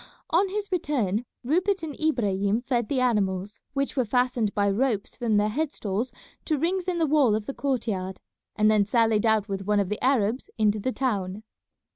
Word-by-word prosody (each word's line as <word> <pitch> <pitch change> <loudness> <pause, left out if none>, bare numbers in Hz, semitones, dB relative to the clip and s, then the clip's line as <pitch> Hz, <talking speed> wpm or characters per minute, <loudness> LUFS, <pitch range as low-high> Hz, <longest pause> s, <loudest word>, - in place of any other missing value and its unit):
On 375 +4 +3
his 405 0 -4
return 245 - 0 0.2
Rupert 365 +8 +1
and 310 -2 -4
Ibrahim 210 -8 +1
fed 240 -3 -1
the 275 - +1
animals, 205 -4 0
which 275 -1 -1
were 260 - +2
fastened 245 -2 +1
by 205 -1 +2
ropes 210 0 0
from 230 -4 +1
their 210 +1 +2
head 295 +6 -1
stalls 215 +3 -3 0.3
to 310 - +1
rings 355 +5 -1
in 360 -2 0
the 330 - +2
wall 280 -7 +4
of 215 -1 -3
the 275 - -4
court 265 -5 -1
yard, 190 -2 -3 0.4
and 215 -1 +4
then 210 -1 +4
sallied 225 0 +2
out 220 -2 +2
with 195 -1 -4
one 210 -1 +3
of 195 -2 0
the 210 - -4
Arabs 250 -2 +1
into 215 -1 +2
the 255 +6 -1
town. 210 -6 -2
230 Hz, 195 wpm, -26 LUFS, 205-275 Hz, 0.4 s, wall